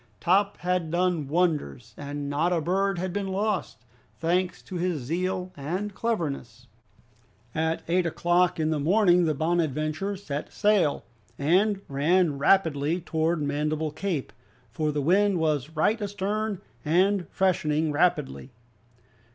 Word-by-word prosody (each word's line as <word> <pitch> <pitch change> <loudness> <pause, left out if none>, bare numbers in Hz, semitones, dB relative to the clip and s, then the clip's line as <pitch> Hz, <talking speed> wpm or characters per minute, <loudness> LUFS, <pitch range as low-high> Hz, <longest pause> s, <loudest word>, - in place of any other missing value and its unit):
Top 200 +3 +2
had 180 -2 0
done 175 -3 0
wonders, 150 - -1
and 145 0 -5
not 150 +5 0
a 175 - +2
bird 195 +4 0
had 180 0 -3
been 205 -1 -2
lost, 190 - -2 0.3
thanks 180 +2 0
to 185 - -6
his 170 -6 -1
zeal 180 +5 -2
and 180 +9 -4
cleverness. 140 - -3 0.9
At 160 +1 -1
eight 175 +1 +2
o'clock 175 +1 +1
in 155 0 +1
the 155 - 0
morning 180 +2 +4
the 155 -2 +1
"Bonadventure" 155 +3 -1
set 150 -7 -5
sail, 205 -8 +2 0.3
and 190 +7 +2
ran 150 +2 +2
rapidly 160 -1 +2
towards 160 -1 -1
North 145 - -1
Mandible 150 +1 -1
Cape, 165 -3 -3 0.4
for 150 +5 -1
the 145 -1 -2
wind 195 +4 +3
was 155 -4 0
right 210 +9 +2
astern 205 0 -2 0.2
and 180 +3 +2
freshening 160 -5 +1
rapidly. 140 - 0
170 Hz, 135 wpm, -26 LUFS, 150-190 Hz, 0.9 s, morning